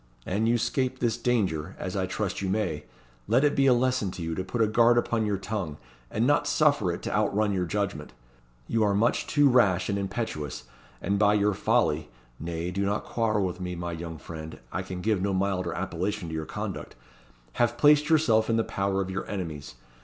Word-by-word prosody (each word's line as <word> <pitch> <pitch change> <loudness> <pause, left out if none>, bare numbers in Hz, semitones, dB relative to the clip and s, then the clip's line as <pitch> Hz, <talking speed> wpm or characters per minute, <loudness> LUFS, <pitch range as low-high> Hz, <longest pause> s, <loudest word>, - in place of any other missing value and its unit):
An 105 +4 0
you 120 +1 +3
'scape 130 +2 -1
this 120 -3 0
danger, 100 -9 -1
as 95 - -5
I 95 -1 0
trust 100 0 -3
you 95 - -1
may, 90 -8 -1 0.4
let 120 +6 +3
it 145 - +3
be 135 -1 +4
a 130 - +7
lesson 125 -5 +1
to 85 - -6
you 80 0 -2
to 95 - -2
put 95 +6 -4
a 110 - +5
guard 115 +2 +4
upon 115 -2 +1
your 100 -1 0
tongue, 95 -6 -4 0.3
and 115 - 0
not 145 +1 +3
suffer 145 - +3
it 85 - -6
to - - -3
out 105 -1 +1
run 105 -1 +2
your 90 -2 -1
judgment. 95 -8 -2 0.6
You 115 - 0
are 100 -1 +2
much 115 +4 +1
too 145 -1 +4
rash 105 -9 +3
and 100 0 0
impetuous, 95 - -4 0.4
and 100 +3 0
by 105 0 +4
your 105 0 +2
folly 75 -5 +1 0.3
(nay, 85 +2 -3
do 100 +2 -1
not 100 +1 0
quarrel 110 -4 0
with 90 0 -4
me, 90 0 -3
my 85 0 -4
young 80 -1 -6
friend 80 0 -8
I 95 - -2
can 90 -1 -6
give 105 -1 +1
no 100 0 0
milder 95 -2 0
appellation 95 +1 -3
to - - -6
your 80 0 -3
conduct) - - -5 0.7
have 120 0 +2
placed 150 +2 +5
yourself 120 -9 +3
in 115 - +2
the 115 - +2
power 95 -1 -1
of 95 - -6
your 95 0 -4
enemies. 80 -10 -5
100 Hz, 215 wpm, -27 LUFS, 90-115 Hz, 0.7 s, a